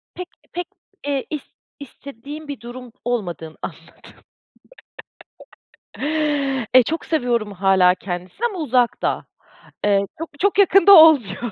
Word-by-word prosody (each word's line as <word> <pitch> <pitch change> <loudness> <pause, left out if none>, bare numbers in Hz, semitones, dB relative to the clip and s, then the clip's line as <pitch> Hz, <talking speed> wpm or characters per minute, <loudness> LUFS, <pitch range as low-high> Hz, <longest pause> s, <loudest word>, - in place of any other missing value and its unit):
Pek 360 -1 -7 0.3
pek, 355 0 -4 0.4
eee, 275 -2 -1
ist 300 -3 -7 0.3
istediğim 285 +2 -10
bir 285 -6 -6
durum 245 0 -10
olmadığını 175 -9 -4
anladım. - - -11 2.5
E, 255 - +8
çok 325 +7 -4
seviyorum 240 -9 -1
hâlâ 190 -1 +3
kendisini 185 - -5
ama 400 -6 -5
uzakta. 250 -5 0 0.6
Iıı, 200 -1 +2
çok 330 - -5
çok 400 +1 +1
yakında 395 0 +6
olmuyor. 245 - +5
250 Hz, 110 wpm, -20 LUFS, 200-315 Hz, 2.5 s, E